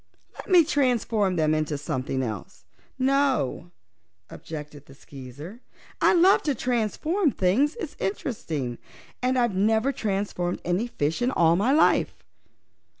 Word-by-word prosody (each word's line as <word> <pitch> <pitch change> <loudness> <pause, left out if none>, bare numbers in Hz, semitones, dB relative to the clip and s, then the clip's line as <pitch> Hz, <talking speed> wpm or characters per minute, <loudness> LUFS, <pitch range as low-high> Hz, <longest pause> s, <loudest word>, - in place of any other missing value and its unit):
"Let - - -11
me 360 -3 +7
transform 235 - +1
them 155 -2 +2
into 155 -1 -1
something 130 -1 -3
else." 110 -6 -7 0.3
"No," 265 - 0 0.6
objected 150 -2 -9
the 135 - -15
Skeezer. 145 - -11 0.4
"I - - +5
love 365 +3 +5
to 290 -3 -1
transform 255 - 0
things; 240 +8 +1
it's 345 -9 -5
so - - -5
interesting. 155 - -4 0.4
And 255 +1 +1
I've 240 -4 +1
never 220 +6 +2
transformed 195 -6 -2
any 180 +7 0
fishes 160 -5 -2
in - - +2
all 170 -9 +3
my 210 +9 +1
life." 305 +3 +2
205 Hz, 135 wpm, -25 LUFS, 155-260 Hz, 0.6 s, me